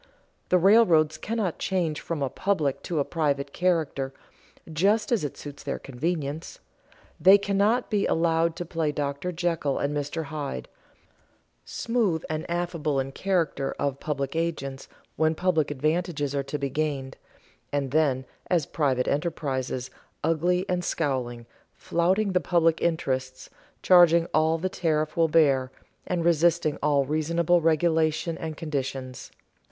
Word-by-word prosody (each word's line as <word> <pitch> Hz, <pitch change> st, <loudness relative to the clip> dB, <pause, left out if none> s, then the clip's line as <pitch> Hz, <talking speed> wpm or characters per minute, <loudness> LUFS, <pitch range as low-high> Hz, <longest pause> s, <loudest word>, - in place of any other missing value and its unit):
The 180 Hz, -, +5 dB
railroads 175 Hz, -5 st, +5 dB
cannot 215 Hz, -6 st, -2 dB
change 170 Hz, -5 st, -1 dB
from 160 Hz, -4 st, -3 dB
a 135 Hz, -, 0 dB
public 150 Hz, -9 st, 0 dB
to 170 Hz, -, -1 dB
a 145 Hz, -, +1 dB
private 145 Hz, -4 st, -1 dB
character 160 Hz, -7 st, 0 dB, 0.6 s
just 200 Hz, +10 st, +2 dB
as 230 Hz, -8 st, +2 dB
it 145 Hz, -, -4 dB
suits 145 Hz, -1 st, -9 dB
their 140 Hz, -, -3 dB
convenience. 150 Hz, +3 st, -4 dB, 0.6 s
They 190 Hz, +2 st, +8 dB
cannot 205 Hz, +5 st, +1 dB
be 205 Hz, -2 st, +2 dB
allowed 165 Hz, 0 st, +1 dB
to 175 Hz, -, -5 dB
play 160 Hz, -2 st, -1 dB
Dr. 145 Hz, +4 st, -3 dB
Jekyll 165 Hz, -5 st, -1 dB
and 145 Hz, +1 st, -1 dB
Mr. 145 Hz, +3 st, -2 dB
Hyde; 145 Hz, -, -5 dB, 1.0 s
smooth 225 Hz, -9 st, -1 dB
and 155 Hz, +1 st, -4 dB
affable 170 Hz, -5 st, -1 dB
in 135 Hz, 0 st, -2 dB
the -, -, -14 dB
character 170 Hz, -8 st, -1 dB
of 140 Hz, -1 st, -2 dB
public 140 Hz, -1 st, -3 dB
agents 150 Hz, -5 st, -3 dB, 0.3 s
when 160 Hz, +1 st, +2 dB
public 160 Hz, -4 st, +1 dB
advantages 150 Hz, 0 st, -1 dB
are 140 Hz, -, 0 dB
to 140 Hz, +2 st, -4 dB
be 140 Hz, -1 st, -3 dB
gained, 140 Hz, -2 st, -2 dB, 0.6 s
and 140 Hz, -2 st, -1 dB
then 140 Hz, -4 st, +2 dB, 0.2 s
as 170 Hz, -5 st, +2 dB
private 135 Hz, -5 st, 0 dB
enterprises 135 Hz, -5 st, -2 dB, 0.3 s
ugly 175 Hz, +3 st, +1 dB
and 180 Hz, -1 st, -1 dB
scowling, 125 Hz, -8 st, -2 dB, 0.3 s
flouting 190 Hz, +5 st, +1 dB
the 185 Hz, -, +3 dB
public 165 Hz, 0 st, +2 dB
interests, 130 Hz, -6 st, -2 dB, 0.3 s
charging 170 Hz, -2 st, +6 dB
all 160 Hz, +1 st, +3 dB
the 180 Hz, +3 st, -1 dB
traffic 155 Hz, -4 st, -1 dB
will 165 Hz, -1 st, +3 dB
bear, 140 Hz, -5 st, +3 dB, 0.4 s
and 175 Hz, -2 st, -1 dB
resisting 170 Hz, -2 st, +2 dB
all 145 Hz, -2 st, +2 dB
reasonable 165 Hz, +4 st, +1 dB
regulation 160 Hz, 0 st, +1 dB
and 160 Hz, -2 st, -6 dB
conditions. 135 Hz, -4 st, -4 dB
155 Hz, 140 wpm, -26 LUFS, 140-170 Hz, 1.0 s, They